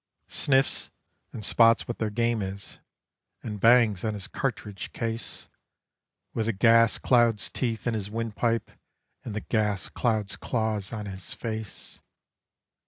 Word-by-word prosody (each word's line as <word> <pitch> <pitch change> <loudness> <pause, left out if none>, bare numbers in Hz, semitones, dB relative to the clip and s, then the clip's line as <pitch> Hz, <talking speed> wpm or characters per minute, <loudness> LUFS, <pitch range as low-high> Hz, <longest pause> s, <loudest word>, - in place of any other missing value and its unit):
Sniffs, 135 -1 +1 0.4
and 105 - -6
spots 115 +1 +5
what 120 - -4
their 110 - 0
game 115 +1 0
is, 95 +1 -6 0.6
and 105 -2 -5
bangs 115 -3 +5
on 110 -1 -1
his 100 -2 -6
cartridge 105 -7 -4
case, 115 0 -4 0.9
With 110 -1 -1
the 115 - +1
gas 115 +2 +5
cloud's 120 -4 +3
teeth 115 -4 -2
in 120 - +1
his 105 -2 -3
windpipe 115 +1 -1 0.5
and 110 - -6
the 105 - -2
gas 105 -4 0
cloud's 110 -5 -1
claws 110 -4 -1
on 110 -3 -5
his 95 -2 -5
face. 110 -3 -6
110 Hz, 135 wpm, -27 LUFS, 105-115 Hz, 0.9 s, spots